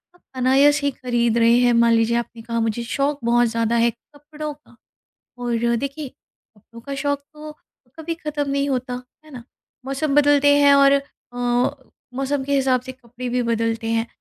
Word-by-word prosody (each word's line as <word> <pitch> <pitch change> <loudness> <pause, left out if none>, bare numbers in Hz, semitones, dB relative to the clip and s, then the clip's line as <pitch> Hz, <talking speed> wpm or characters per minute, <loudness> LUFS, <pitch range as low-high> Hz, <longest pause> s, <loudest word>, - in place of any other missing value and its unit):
आप 355 - -26
अनायस 275 +3 +3
ही 285 - +2
खरीद 240 -3 -1
रहे 230 +1 +4
हैं, 245 -1 +3
मान 235 0 +4
लीजिए 230 +1 +2
आपने 235 -1 -5
कहा 230 0 -3
मुझे 225 +1 -1
शौक़ 280 +4 -1
बहुत 240 +1 +3
ज़्यादा 230 0 -1
है 235 0 +3
कपड़ों 295 +5 -9
का 290 -4 -23 0.6
और 235 -1 0
देखिए, 280 +3 -5 0.5
कपड़ों 230 +3 -15
का 275 +4 -7
शौक़ 285 0 -1
तो 305 0 -10 0.4
कभी 325 +1 -4
ख़त्म 300 -3 -4
नहीं 280 0 0
होता, 250 -1 -3 0.2
है 310 - -17
ना? 250 -4 -9 0.4
मौसम 275 +2 -2
बदलते 290 0 +5
हैं 285 -1 +6
और 275 0 +5
अ, 275 -3 -4 0.8
मौसम 270 +1 -2
के 280 +1 -1
हिसाब 265 -2 +2
से 260 +1 -9
कपड़े 250 0 -9
भी 250 +1 0
बदलते 230 -1 -1
हैं 230 0 0
255 Hz, 175 wpm, -21 LUFS, 235-285 Hz, 0.8 s, हैं